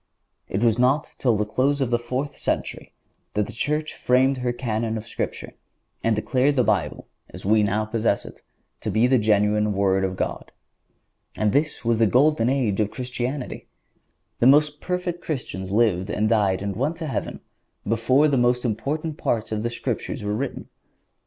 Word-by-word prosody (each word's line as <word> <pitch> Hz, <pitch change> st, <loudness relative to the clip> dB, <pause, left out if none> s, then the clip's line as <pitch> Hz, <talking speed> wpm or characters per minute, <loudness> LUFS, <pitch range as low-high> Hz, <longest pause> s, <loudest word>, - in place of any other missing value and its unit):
It 100 Hz, +4 st, -1 dB
was 115 Hz, 0 st, +3 dB
not 130 Hz, +4 st, +2 dB
till 120 Hz, -5 st, +2 dB
the 105 Hz, -, 0 dB
close 135 Hz, +6 st, +1 dB
of 130 Hz, -3 st, 0 dB
the 120 Hz, -, +2 dB
fourth 130 Hz, +4 st, -3 dB
century -, -, -3 dB, 0.4 s
that 105 Hz, 0 st, +2 dB
the 115 Hz, -, -9 dB
Church 150 Hz, +6 st, -1 dB
framed 130 Hz, +2 st, +2 dB
her 125 Hz, -1 st, 0 dB
Canon 115 Hz, -2 st, -2 dB
of 110 Hz, -, -7 dB
Scripture 115 Hz, -, -5 dB, 0.5 s
and 115 Hz, -1 st, +2 dB
declared 130 Hz, +6 st, +1 dB
the 125 Hz, -, +3 dB
Bible, 85 Hz, -10 st, -1 dB, 0.2 s
as -, -, -10 dB
we 110 Hz, +2 st, +4 dB
now 105 Hz, +1 st, +1 dB
possess 110 Hz, -1 st, 0 dB
it, -, -, -12 dB, 0.4 s
to -, -, -4 dB
be 110 Hz, +2 st, +3 dB
the 130 Hz, 0 st, +4 dB
genuine 105 Hz, 0 st, +2 dB
Word 95 Hz, -1 st, +2 dB
of 95 Hz, -1 st, -1 dB
God. -, -, -4 dB, 0.9 s
And 105 Hz, -1 st, +2 dB
this 145 Hz, -1 st, 0 dB
was 115 Hz, -1 st, +2 dB
the 115 Hz, -, +5 dB
golden 130 Hz, +1 st, +3 dB
age 125 Hz, -7 st, 0 dB
of 105 Hz, -1 st, +1 dB
Christianity! 125 Hz, +2 st, -4 dB, 0.7 s
The 120 Hz, -, +5 dB
most 150 Hz, +2 st, +4 dB
perfect 180 Hz, -1 st, -3 dB
Christians 105 Hz, -, -4 dB
lived 100 Hz, -3 st, +2 dB
and 105 Hz, +1 st, 0 dB
died 100 Hz, -4 st, +2 dB
and 100 Hz, -1 st, -3 dB
went 140 Hz, +8 st, -1 dB
to 165 Hz, -, -5 dB
heaven 140 Hz, -, -3 dB, 0.5 s
before 115 Hz, +7 st, +3 dB
the 140 Hz, -2 st, +2 dB
most 125 Hz, 0 st, +2 dB
important 150 Hz, +7 st, -2 dB
parts 110 Hz, -2 st, -1 dB
of 110 Hz, -1 st, -1 dB
the 120 Hz, -, -1 dB
Scriptures 120 Hz, -, -4 dB
were 105 Hz, 0 st, -1 dB
written. 130 Hz, +5 st, -4 dB
120 Hz, 180 wpm, -24 LUFS, 105-135 Hz, 0.9 s, the